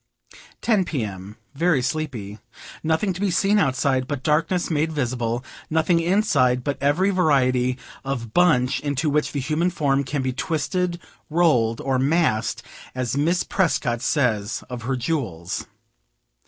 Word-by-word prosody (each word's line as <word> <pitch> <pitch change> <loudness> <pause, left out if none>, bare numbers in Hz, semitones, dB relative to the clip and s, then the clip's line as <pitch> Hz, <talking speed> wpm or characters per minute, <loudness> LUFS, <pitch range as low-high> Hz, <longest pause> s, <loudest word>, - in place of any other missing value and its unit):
Ten 215 -5 +3
P. 145 -8 -2
M. 100 0 -7 0.2
Very 150 -2 +2
sleepy. 125 -8 -3 0.4
Nothing 160 +5 +1
to 180 - -7
be 205 - +2
seen 195 +4 +3
outside, 130 -4 +1
but 140 -3 -4
darkness 165 +4 +1
made 160 +1 +1
visible; 120 -3 -2 0.2
nothing 160 +2 +2
inside 145 -9 +2
but 140 0 -3
every 160 +8 +2
variety 130 -8 +2 0.3
of 125 -5 -4
bunch 145 -8 +3
into 145 +1 -1
which 150 +1 +1
the 145 - -2
human 155 +6 0
form 140 -5 +1
can 135 0 -2
be 130 -1 -1
twisted, 170 +4 -1 0.3
rolled, 125 -9 +2
or 135 -1 0
"massed," 135 -6 +1 0.3
as 125 -1 -2
Miss 165 +5 +1
Prescott 125 - 0
says 120 -7 0
of 125 -1 -5
her 135 - +1
jewels. 115 - -3
140 Hz, 140 wpm, -23 LUFS, 125-165 Hz, 0.4 s, Ten